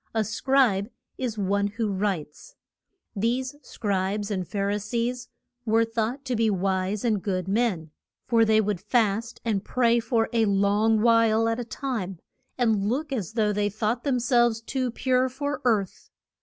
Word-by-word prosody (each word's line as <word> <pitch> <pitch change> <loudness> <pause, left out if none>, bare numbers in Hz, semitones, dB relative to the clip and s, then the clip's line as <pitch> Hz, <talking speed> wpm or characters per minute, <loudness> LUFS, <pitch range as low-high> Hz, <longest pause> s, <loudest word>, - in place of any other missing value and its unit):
A 220 - +2
Scribe 225 -2 +2 0.3
is 240 -4 -3
one 200 0 +1
who 210 +1 -2
writes. 190 - -3 0.6
These 245 +6 -1
Scribes 200 -1 -2
and 185 -3 -2
Phar 200 -1 -1
i 205 - 0
sees 235 +4 -3 0.3
were 225 0 +3
thought 230 +4 -3
to 255 -2 -1
be 225 -1 +2
wise 195 +2 -1
and 215 -4 +1
good 185 -2 -2
men, 195 -7 0 0.3
for 230 -1 +3
they 220 -1 +4
would 205 -4 -2
fast 225 +1 0
and 205 -4 0
pray 235 0 +2
for 230 -1 0
a 225 -1 +3
long 205 +2 +2
while 225 -1 +4
at 230 +1 0
a - - -2
time, 225 -6 -4 0.4
and 220 -5 +1
look 285 +4 -2
as 215 -7 -3
though 215 -2 +1
they 205 0 0
thought 215 +3 -2
them 270 -4 +1
selves 240 -2 +3
too 255 +2 -2
pure 255 +1 +1
for 285 +3 -4
earth. 210 -6 0
220 Hz, 165 wpm, -26 LUFS, 200-240 Hz, 0.6 s, they